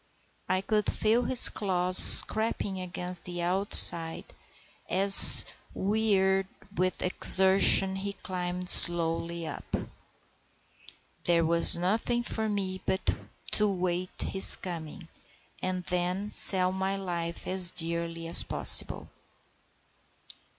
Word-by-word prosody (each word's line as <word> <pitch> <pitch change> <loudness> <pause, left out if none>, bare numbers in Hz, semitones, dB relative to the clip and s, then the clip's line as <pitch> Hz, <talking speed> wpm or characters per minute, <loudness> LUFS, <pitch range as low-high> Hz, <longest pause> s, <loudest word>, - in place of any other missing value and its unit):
I 185 0 -3
could 210 +1 -4
feel 220 +3 -3
his 255 - +5
claws 185 -2 -5
scraping 210 -3 +2
against 180 0 -9
the 175 -1 -9
outside 175 -3 +3 0.7
as, 195 +2 +7 0.3
wearied 195 -2 -3 0.3
with 185 0 -5
his 180 - -4
exertion, 190 0 +3
he 200 +1 -8
climbed 180 -1 -9
slowly 170 -1 +1
up. - - -9 1.5
There 170 -1 -1
was 170 +1 +4
nothing 225 +7 -5
for 220 -2 -6
me 190 -2 -7
but 190 - -5 0.4
to 210 -1 -2
wait 180 -1 -7
his 190 - +5
coming, 170 0 -12 0.5
and 185 0 -7
then 180 +3 -6
sell 185 -1 +3
my 190 +1 -6
life 170 -3 -9
as 185 -1 +1
dearly 165 0 -7
as 165 - +4
possible. - - -2
185 Hz, 110 wpm, -24 LUFS, 175-195 Hz, 1.5 s, as